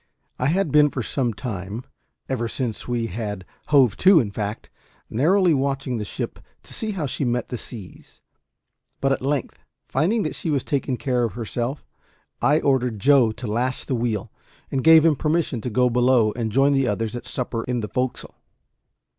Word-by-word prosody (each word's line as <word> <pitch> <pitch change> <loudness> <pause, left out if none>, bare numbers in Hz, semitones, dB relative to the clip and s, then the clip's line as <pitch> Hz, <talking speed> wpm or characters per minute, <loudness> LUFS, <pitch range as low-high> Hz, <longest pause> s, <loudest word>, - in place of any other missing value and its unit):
I 125 - +1
had 175 0 +1
been 150 0 +6
for 130 -4 -4
some 125 +1 0
time 105 -1 -5 0.4
ever 120 -3 -1
since 115 -2 -4
we 120 -2 -1
had 105 -2 -5 0.2
hove 135 -7 +4
to, 185 -2 +6
in 110 -7 -1
fact 105 +1 -5 0.4
narrowly 175 - +3
watching 135 -3 -1
the 105 - -3
ship - - -5 0.2
to - - -11
see 220 -2 -3
how 175 -6 -2
she 140 - -2
met 120 -1 -1
the 125 - -3
seas; 105 -7 -11 0.8
but 135 - +1
at 135 - 0
length, 140 0 -2 0.3
finding 195 - +1
that - - -2
she 165 - -4
was 140 -4 +1
taking 135 -3 -1
care 125 -2 0
of 115 -5 -1
herself, 120 +4 -4 0.6
I 150 +2 +3
ordered 125 -5 +1
Joe 130 0 +4
to 120 - -8
lash 120 +4 -1
the - - -3
wheel, 115 -4 -2 0.4
and 135 -2 -1
gave 160 -1 +7
him 160 -2 +5
permission 150 -5 0
to 125 - -3
go 125 +3 +3
below 125 -2 +3
and 115 -2 -2
join 135 +5 +4
the 135 -2 +2
others 110 +2 -2
at 120 - -6
supper 120 -3 -3
in 125 -1 -1
the 105 - -3
forecastle. 125 +2 -3
125 Hz, 185 wpm, -23 LUFS, 115-140 Hz, 0.8 s, gave